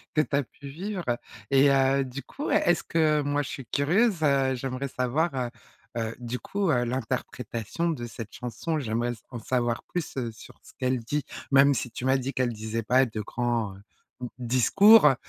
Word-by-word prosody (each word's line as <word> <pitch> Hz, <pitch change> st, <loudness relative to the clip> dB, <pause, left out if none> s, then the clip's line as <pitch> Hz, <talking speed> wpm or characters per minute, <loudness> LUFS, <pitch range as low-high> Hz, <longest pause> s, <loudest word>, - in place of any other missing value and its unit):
que 155 Hz, -, +5 dB
tu 145 Hz, -, -6 dB
as 140 Hz, -, +2 dB
pu 140 Hz, +3 st, -12 dB
vivre, 185 Hz, +5 st, -4 dB, 0.5 s
et 135 Hz, +1 st, +6 dB
heu, 135 Hz, 0 st, +3 dB
du 130 Hz, +2 st, -7 dB
coup, 290 Hz, -, -5 dB
est -, -, +4 dB
est-ce 175 Hz, -, +2 dB
que 155 Hz, -2 st, +2 dB
moi, 145 Hz, +1 st, 0 dB
je 145 Hz, -, -5 dB
suis 135 Hz, -, -6 dB
curieuse, 175 Hz, -, +2 dB
heu, 135 Hz, -3 st, +3 dB
j'aimerais 130 Hz, +2 st, -3 dB
savoir, 130 Hz, +7 st, 0 dB
heu 125 Hz, -2 st, -1 dB, 0.5 s
heu, 115 Hz, 0 st, -2 dB
du 120 Hz, +1 st, -4 dB
coup, 200 Hz, -2 st, -1 dB
heu, 120 Hz, -1 st, +2 dB
l'interprétation 120 Hz, +3 st, -3 dB
de 130 Hz, -8 st, -3 dB
cette 115 Hz, -2 st, -8 dB
chanson, 155 Hz, +6 st, -3 dB
j'aimerais 120 Hz, -1 st, -1 dB
s 115 Hz, -, -9 dB
en 120 Hz, -, -5 dB
savoir 120 Hz, 0 st, -1 dB
plus, 175 Hz, -5 st, -4 dB
heu, 120 Hz, -3 st, -2 dB
sur 110 Hz, -, -14 dB
ce -, -, -15 dB
qu'elle 130 Hz, -1 st, +1 dB
dit, 145 Hz, +6 st, -2 dB, 0.3 s
même 140 Hz, +1 st, +6 dB
si 120 Hz, -1 st, -3 dB
tu 125 Hz, -, -5 dB
m'as 130 Hz, +1 st, +4 dB
dit 130 Hz, +1 st, -3 dB
qu'elle 125 Hz, -2 st, 0 dB
disait 110 Hz, +1 st, -3 dB
pas 130 Hz, +3 st, +4 dB
de 110 Hz, -2 st, -5 dB
grands, 115 Hz, -1 st, -1 dB
heu, -, -, -14 dB
d -, -, -24 dB, 0.6 s
discours, 150 Hz, -, +6 dB
heu 135 Hz, -, +5 dB
130 Hz, 205 wpm, -27 LUFS, 120-145 Hz, 0.6 s, et